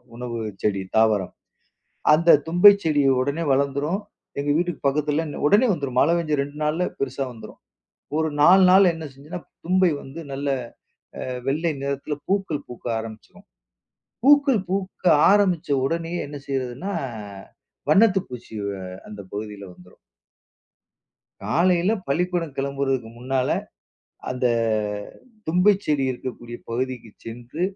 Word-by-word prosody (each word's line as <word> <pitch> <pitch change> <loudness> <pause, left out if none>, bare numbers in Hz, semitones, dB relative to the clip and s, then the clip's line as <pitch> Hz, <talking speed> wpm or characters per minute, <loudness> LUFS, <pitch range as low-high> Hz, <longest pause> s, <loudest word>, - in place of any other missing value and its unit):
உணவு 120 -1 -5 0.2
செடி, 100 -2 0 0.2
தாவரம். 110 -4 +2 0.8
அந்த 170 +2 +4 0.2
தும்பைச் 200 +4 +7
செடி 150 -2 +2 0.2
உடனே 140 +5 -1
வளர்ந்துரும். 140 +7 0 0.4
எங்க 145 +1 -1
வீட்டுக்கு 175 +1 -1
பக்கத்தில 150 +3 +1 0.2
உடனே 215 +8 +5
வந்துரும். 140 -6 -3
மழை 165 +4 +4
பெஞ்ச 155 -3 -1
2 145 +1 -8
நாள்ல 160 +4 0
பெருசா 135 0 -2
வந்துரும். 115 - -12 0.6
ஒரு 160 0 +1
4 190 +5 +7
நாள்ல 190 -1 +6
என்ன 160 -1 -7
செஞ்சுருன்னா 150 +6 -9 0.2
தும்பை 185 0 +3
வந்து 140 +5 -9
நல்ல 140 +1 -3 0.8
அ - - -6 0.2
வெள்ளை 160 +4 +1
நிறத்தில 140 +2 -3
பூக்கள் 190 -7 -1
பூக்க 125 - -11
ஆரம்பிச்சுரும். 115 - -11 0.8
பூக்கள் 280 -5 +5
பூக்க 190 0 -3 0.3
ஆரம்பிச்ச 190 -5 +2 0.2
உடனேயே 165 +2 -2
என்ன 145 0 -7
செய்றதுன்னா 135 +7 -3 1.0
வண்ணத்து 195 +3 +5
பூச்சி 120 -2 -9
வ - - -2 0.4
அந்த 105 -1 -9
பகுதியில 105 -1 -6
வந்துரும். 90 0 -19 1.5
காலையில 180 +4 +2 0.2
பள்ளிக்கூடம் 170 0 -1
கிளம்புறதுக்கு 135 -3 -1
முன்னால, 130 +1 -1 0.8
அந்த 125 0 0 1.0
தும்பைச் 185 +5 +3
செடி 145 -3 +1
இருக்கக்கூடிய 120 -1 -7
பகுதிக்கு 125 -2 -3
சென்று, 120 +8 -7
145 Hz, 120 wpm, -23 LUFS, 130-175 Hz, 1.5 s, தும்பைச்